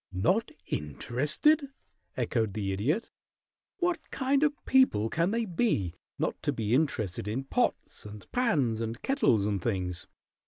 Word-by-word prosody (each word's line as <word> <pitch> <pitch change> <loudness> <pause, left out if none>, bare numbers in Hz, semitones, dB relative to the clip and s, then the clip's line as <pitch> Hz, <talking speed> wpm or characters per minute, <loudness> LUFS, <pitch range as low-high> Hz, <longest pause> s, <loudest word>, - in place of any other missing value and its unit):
"Not 115 - +1 0.2
interested?" 145 - +1 0.5
echoed 110 -4 0
the 100 -2 -1
Idiot. 135 - -1 0.7
"What 355 -2 -1
kind 270 +1 +1
of 295 -1 +3
people 260 - +4
can 170 +2 +1
they 230 +2 0
be 170 - 0 0.2
not - - -2
to - - 0
be 110 0 -1
interested 110 - 0
in 120 +6 -2
pots 135 - -1
and 105 0 -10
pans 145 - +1
and 115 +2 -3
kettles 125 - +3
and 100 -3 -1
things? 90 -4 -2
125 Hz, 135 wpm, -29 LUFS, -, 0.7 s, people